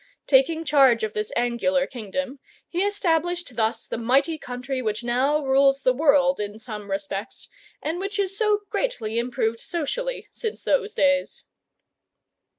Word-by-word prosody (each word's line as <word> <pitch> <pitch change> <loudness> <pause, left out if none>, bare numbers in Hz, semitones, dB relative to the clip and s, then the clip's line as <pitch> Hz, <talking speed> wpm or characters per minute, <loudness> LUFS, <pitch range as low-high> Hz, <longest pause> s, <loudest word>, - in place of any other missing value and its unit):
Taking 315 +4 +3
charge 270 -6 +5
of 215 -1 -2
this 210 0 -3
angular 245 +3 +1
kingdom, 265 +4 -5 0.3
he 355 - -2
established 350 -7 0
thus 220 0 0
the - - -4
mighty 275 +7 +2
country 250 +1 -4
which 215 -1 -2
now 270 +5 +1
rules 275 +1 +4
the 255 - +4
world 280 -2 +3
in 205 0 -4
some 215 -3 -8
respects, 195 +3 -4 0.4
and 325 +3 -2
which 395 +2 -4
is 390 -1 -1
so 425 -1 +2
greatly 230 - -1
improved 235 -2 -1
socially - - -3
since 445 -3 -5
those 440 -3 +1
days. 280 -1 +1
270 Hz, 145 wpm, -24 LUFS, 235-330 Hz, 0.4 s, charge